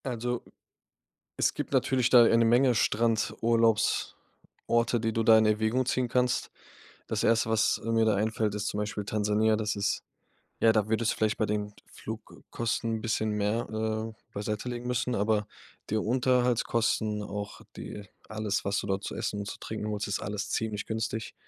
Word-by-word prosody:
Also, 120 -1 -2 1.0
es - - +2
gibt - - -5
natürlich 130 -2 +2
da 120 -2 +8
eine 115 0 +4
Menge 120 +2 +4
Strandurlaubsorte, 115 +1 0
die 115 0 -1
du 115 - +1
da 110 0 +7
in 110 - +4
Erwägung 110 +4 +1
ziehen 130 -1 0
kannst. 125 0 0 0.6
Das - - -2
1., 115 0 +2
was, 110 -1 +2
äh, 115 - -2
mir 115 -1 +3
da 110 - +3
einfällt, 105 0 0
ist 105 0 -2
zum - - -4
Beispiel 105 0 -3
Tansania. 105 +1 +1
Das 105 -1 -2
ist 100 0 -1 0.6
ja, 115 - +6
da 110 -2 +1
würdest 110 +1 +1
du - - -7
vielleicht 110 +1 +1
bei 110 - +1
den 105 0 -2
Flugkosten 115 +1 -4
'n - - -6
bisschen 110 -1 -1
mehr, 105 +2 0
äh, 110 0 -2 0.2
beiseitelegen 110 +4 -4
müssen, 125 0 -1
aber 105 0 +1 0.4
die 110 - 0
Unterhaltskosten, 115 -2 +1
auch 105 0 -6
die 105 -1 -8 0.2
alles, 110 -1 -2
was 100 0 0
du - - -7
dort 95 0 -1
zu - - -4
essen 105 - -3
und 100 - -5
zu - - -6
trinken 110 -1 -5
holst, 105 -1 -2
ist 100 - -1
alles 100 0 -4
ziemlich 110 -2 -2
günstig, 110 0 -3
110 Hz, 170 wpm, -28 LUFS, 105-115 Hz, 1.0 s, da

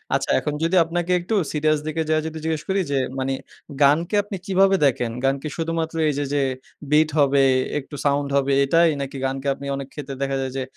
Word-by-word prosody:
আচ্ছা - - -2
এখন 150 - -3
যদি 170 +3 +1
আপনাকে 175 +2 -2
একটু 180 +6 -2 0.2
সিরিয়াস 155 0 +1
দিকে 160 +1 -1
যাইয়া 155 0 +2
যদি 160 0 -6
জিজ্ঞেস 160 -1 -1
করি 190 0 +2
যে 140 - +1 0.2
মানি 135 0 -1 0.5
গানকে 155 +8 +3
আপনি 205 -1 -6
কিভাবে 195 0 +4
দেখেন? 120 -3 +1
গানকে 135 +2 0
শুধুমাত্র 165 0 -2
এইযে 145 0 -1
যে 145 - +2 0.5
bit 155 +1 +4
হবে 140 -1 +4 0.4
একটু 145 +1 -10
সাউন্ড 140 0 +1
হবে 140 0 +2
এটাই? 165 +4 +4
নাকি 135 0 -5
গানকে 135 +1 -3 0.3
অনেক 135 -1 -6
ক্ষেত্রে 140 -2 -6
দেখা 135 0 -1
যায় 130 -1 -3
যে 135 - -1
150 Hz, 190 wpm, -22 LUFS, 140-165 Hz, 0.5 s, কিভাবে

